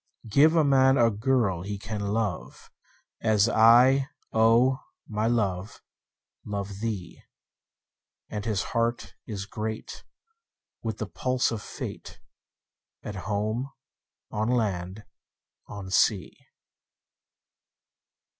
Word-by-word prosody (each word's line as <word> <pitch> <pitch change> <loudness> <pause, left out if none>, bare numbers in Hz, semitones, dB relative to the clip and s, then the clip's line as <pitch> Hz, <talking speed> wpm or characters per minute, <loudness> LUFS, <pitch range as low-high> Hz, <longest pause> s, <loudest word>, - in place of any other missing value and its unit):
Give 145 +9 +5
a 160 - +5
man 135 -1 +4
a 115 -1 +4
girl 110 -5 +1
he 100 +2 -5
can 105 +1 -5
love, 100 - -3 0.5
As 110 -1 +3
I, 120 +4 +6 0.3
O 115 +4 +4 0.3
my 110 0 -1
love, 100 -5 -1 0.6
love 100 -1 -5
thee; 105 -5 -5 1.1
10 - - -6
And 105 - -4
his 105 -4 0
heart 115 0 -1
is 100 -3 -5
great 110 +1 -6 0.8
with 110 -2 -3
the 110 - -3
pulse 130 +4 0
of 110 -2 -4
Fate, - - -8 0.8
At 105 - -5 0.2
home, 110 +6 -1 0.6
on 110 +2 -1
land, 100 -4 -1 0.6
on 100 -2 -8
sea. 95 +1 +2
110 Hz, 105 wpm, -27 LUFS, 100-120 Hz, 1.1 s, I